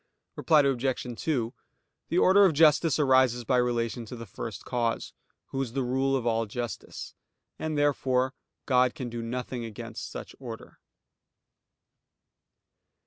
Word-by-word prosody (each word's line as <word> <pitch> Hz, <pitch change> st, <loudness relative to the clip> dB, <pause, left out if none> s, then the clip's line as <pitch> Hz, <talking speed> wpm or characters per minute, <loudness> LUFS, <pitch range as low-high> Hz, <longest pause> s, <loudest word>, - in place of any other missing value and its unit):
Reply 155 Hz, -2 st, +4 dB
Obj. 135 Hz, -2 st, 0 dB, 0.2 s
2: 125 Hz, -7 st, -1 dB, 0.6 s
The 170 Hz, -, 0 dB
order 195 Hz, +2 st, +6 dB
of 185 Hz, -4 st, +5 dB
justice 160 Hz, +1 st, +5 dB
arises 130 Hz, -4 st, +4 dB
by 125 Hz, +2 st, +2 dB
relation 120 Hz, -1 st, 0 dB
to 125 Hz, -, -7 dB
the 115 Hz, -1 st, -8 dB
First 105 Hz, +1 st, -7 dB
Cause, 120 Hz, -2 st, -1 dB, 0.4 s
Who 135 Hz, -, -2 dB
is 120 Hz, -4 st, -4 dB
the 135 Hz, 0 st, 0 dB
rule 135 Hz, +2 st, +1 dB
of 130 Hz, -3 st, -1 dB
all 115 Hz, -1 st, +1 dB
justice; 120 Hz, +2 st, -6 dB, 0.5 s
and 155 Hz, -1 st, -2 dB
therefore 130 Hz, -3 st, +2 dB, 0.3 s
God 125 Hz, -2 st, +3 dB
can 125 Hz, -3 st, -5 dB
do 120 Hz, 0 st, -4 dB
nothing 125 Hz, +1 st, -4 dB
against 110 Hz, -3 st, -7 dB
such -, -, -8 dB
order. -, -, -9 dB
125 Hz, 140 wpm, -28 LUFS, 120-135 Hz, 0.6 s, order